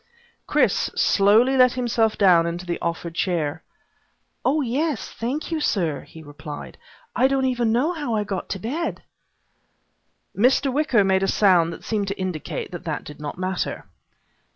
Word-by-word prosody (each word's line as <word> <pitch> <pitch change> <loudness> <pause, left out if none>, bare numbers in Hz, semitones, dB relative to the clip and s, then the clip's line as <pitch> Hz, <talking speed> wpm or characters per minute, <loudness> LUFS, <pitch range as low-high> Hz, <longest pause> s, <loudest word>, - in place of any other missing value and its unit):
Chris - - +2
slowly 220 +7 +4
let 255 -1 +5
himself 230 -3 0
down 175 -4 +5
into 170 +2 -4
the 175 -1 -3
offered 170 0 -3
chair. 165 -4 -1 0.8
"Oh 295 +4 +2
yes, 280 +2 -2
thank 265 +9 -4
you 325 - 0
sir," 170 - 0
he 160 - -13
replied. 145 0 -9 0.4
"I 255 - +4
don't 270 -1 +1
even 240 -3 +1
know 270 +10 +1
how 290 -9 -3
I 210 - 0
got 195 -2 -5
to 195 - -3
bed." 285 - -3 1.3
Mr. 260 +4 +3
Wicker 270 -7 +3
made 190 0 +2
a 195 - +1
sound 180 -6 +4
that 165 - -10
seemed 210 -3 -1
to 200 0 -4
indicate 185 -5 -4
that 175 0 -7
that 155 -3 -3
did 150 - -11
not 150 +1 -5
matter. 185 0 -3
205 Hz, 160 wpm, -23 LUFS, 175-255 Hz, 1.3 s, let